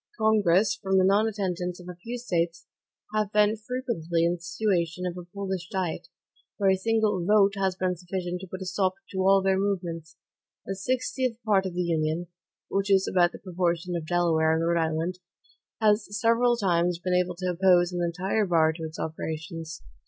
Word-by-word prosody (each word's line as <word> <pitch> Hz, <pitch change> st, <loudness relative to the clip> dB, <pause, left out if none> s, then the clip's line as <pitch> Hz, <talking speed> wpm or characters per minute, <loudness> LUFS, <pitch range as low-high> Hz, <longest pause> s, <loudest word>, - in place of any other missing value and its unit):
Congress, 215 Hz, -2 st, +3 dB
from 190 Hz, -2 st, +1 dB
the 190 Hz, -, +5 dB
nonattendance 190 Hz, -3 st, 0 dB
of 180 Hz, -, -12 dB
a 180 Hz, -, -6 dB
few 230 Hz, +8 st, -6 dB
States, 170 Hz, -7 st, -2 dB, 0.5 s
have 215 Hz, -1 st, 0 dB
been 210 Hz, 0 st, +3 dB
frequently 210 Hz, -8 st, -2 dB
in 170 Hz, -, +2 dB
the 175 Hz, -, -7 dB
situation 175 Hz, -1 st, -1 dB
of 175 Hz, -1 st, -3 dB
a 180 Hz, -1 st, -9 dB
Polish 190 Hz, -2 st, -4 dB
diet, 185 Hz, -6 st, -3 dB, 0.5 s
where 195 Hz, -2 st, +3 dB
a -, -, +4 dB
single 210 Hz, -2 st, +1 dB
VOTE 200 Hz, +1 st, +4 dB
has 190 Hz, -1 st, 0 dB
been 185 Hz, -1 st, -1 dB
sufficient 180 Hz, 0 st, -4 dB
to 190 Hz, -, -8 dB
put 185 Hz, +2 st, -6 dB
a -, -, -8 dB
stop 185 Hz, 0 st, 0 dB, 0.2 s
to 190 Hz, -, -4 dB
all 195 Hz, +1 st, +4 dB
their 190 Hz, 0 st, +2 dB
movements. 175 Hz, -5 st, -3 dB, 0.5 s
A 195 Hz, -, -2 dB
sixtieth 255 Hz, +3 st, -1 dB
part 195 Hz, -3 st, +3 dB
of 180 Hz, -, -7 dB
the 180 Hz, -, 0 dB
Union, 160 Hz, 0 st, 0 dB, 0.5 s
which 195 Hz, +1 st, 0 dB
is 190 Hz, -1 st, +4 dB
about 175 Hz, -1 st, +3 dB
the -, -, -9 dB
proportion 175 Hz, -1 st, -2 dB
of 165 Hz, -2 st, -4 dB
Delaware 160 Hz, -2 st, +2 dB
and 165 Hz, +1 st, 0 dB
Rhode 170 Hz, 0 st, +2 dB
Island, 165 Hz, +3 st, -2 dB, 0.6 s
has 215 Hz, -1 st, +3 dB
several 235 Hz, +2 st, +3 dB
times 175 Hz, -4 st, +1 dB
been 180 Hz, +1 st, -2 dB
able 180 Hz, 0 st, +1 dB
to 185 Hz, +1 st, -2 dB
oppose 180 Hz, 0 st, +4 dB
an 175 Hz, -1 st, -2 dB
entire 190 Hz, +5 st, 0 dB
bar 160 Hz, -2 st, +3 dB
to 165 Hz, 0 st, -8 dB
its 160 Hz, 0 st, -6 dB
operations. 160 Hz, +1 st, -5 dB
185 Hz, 185 wpm, -27 LUFS, 170-200 Hz, 0.6 s, the